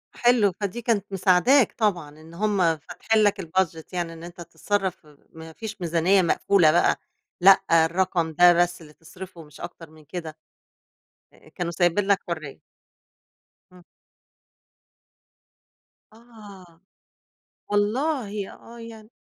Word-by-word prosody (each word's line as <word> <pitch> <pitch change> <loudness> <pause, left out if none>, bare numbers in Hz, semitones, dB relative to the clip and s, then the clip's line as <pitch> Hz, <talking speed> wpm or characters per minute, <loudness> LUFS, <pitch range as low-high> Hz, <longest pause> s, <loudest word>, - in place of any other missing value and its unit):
حلو، 240 -5 +3
فدي 205 +4 -3
كانت 220 -4 0
مساعداك 195 +8 +3
طبعًا، 180 -9 0
إن 160 +1 -15
هم 205 +3 -1 0.2
فاتحين 215 +7 -1
لك 205 -1 +1
الbudget 165 -2 -2
يعني 175 -2 -3
إن 165 - -12
أنت 175 0 -10
تتصرف 190 0 -3 0.2
ما 160 0 -12
فيش 215 -1 -8
ميزانية 175 +3 +2
مقفولة 170 -1 +3
بقى، 175 - +3 0.5
لأ 195 +1 +7 0.2
الرقم 170 -1 -1
ده 175 +2 +6
بس 175 0 0
اللي 150 -1 -15
تصرفه 180 +1 -12
مش 150 -2 -16
أكتر 165 -3 -9
من 155 -1 -19
كده. 160 -1 -7 1.0
آآ، - - -21
كانوا 175 -1 -4
سايبين 175 +3 +1
لك 200 -1 +3
حرية. 155 -5 -6 1.1
امم. 180 -1 -18 2.3
آه، 205 -7 -16 0.9
والله 210 0 -1
آه 235 +1 -14
يعني 225 -1 -12
185 Hz, 120 wpm, -24 LUFS, 165-205 Hz, 2.3 s, لأ